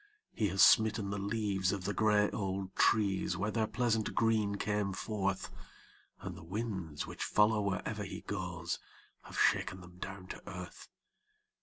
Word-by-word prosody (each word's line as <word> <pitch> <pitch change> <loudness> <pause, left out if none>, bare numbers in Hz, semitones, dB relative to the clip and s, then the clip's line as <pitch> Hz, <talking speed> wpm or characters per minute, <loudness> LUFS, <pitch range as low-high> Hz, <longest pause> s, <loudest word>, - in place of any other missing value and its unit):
He 105 - +1
has 95 +1 +4
smitten 110 -2 +5
the 100 - -2
leaves 100 -2 0
of 100 -3 -3
the 105 - 0
gray 105 -1 +4
old 95 -2 -3
trees 100 -3 +2
where 105 +2 -1
their 110 -1 +1
pleasant 115 -3 0
green 110 -3 +2
came 105 -1 -1
forth, 100 0 -2 0.7
And - - -6
the - - -11
winds, 95 -5 -4
which - - -5
follow 105 0 +3
wherever 100 -2 -2
he - - -6
goes, - - -3 0.4
have - - -10
shaken 95 - +2
them 90 0 -14
down 95 -1 -6
to - - -7
earth. 90 -2 -8
100 Hz, 155 wpm, -33 LUFS, 95-110 Hz, 0.7 s, smitten